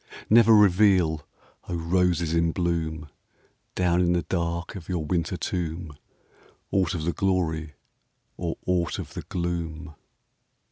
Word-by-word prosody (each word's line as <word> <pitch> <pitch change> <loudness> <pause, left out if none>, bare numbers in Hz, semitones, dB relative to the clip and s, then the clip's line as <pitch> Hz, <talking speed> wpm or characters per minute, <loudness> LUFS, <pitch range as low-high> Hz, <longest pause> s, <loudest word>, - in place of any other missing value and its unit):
Never 115 0 +7
reveal, 90 -6 +4 0.4
O 90 - -2
roses 85 -1 +1
in 85 -1 +2
bloom, 80 -3 -2 0.7
Down 90 -1 +2
in 90 -1 +3
the 85 -1 0
dark 85 -1 -2
of 95 -3 -9
your 85 -4 -2
winter 85 +2 -1
tomb, 85 -4 -4 0.8
Aught 95 -3 +1
of 80 - -3
the 85 +2 0
glory 80 -5 -1 0.6
or 85 -2 -3
aught 90 -2 0
of - - -7
the - - -5
gloom 85 -2 -4
85 Hz, 130 wpm, -26 LUFS, 80-90 Hz, 0.8 s, Never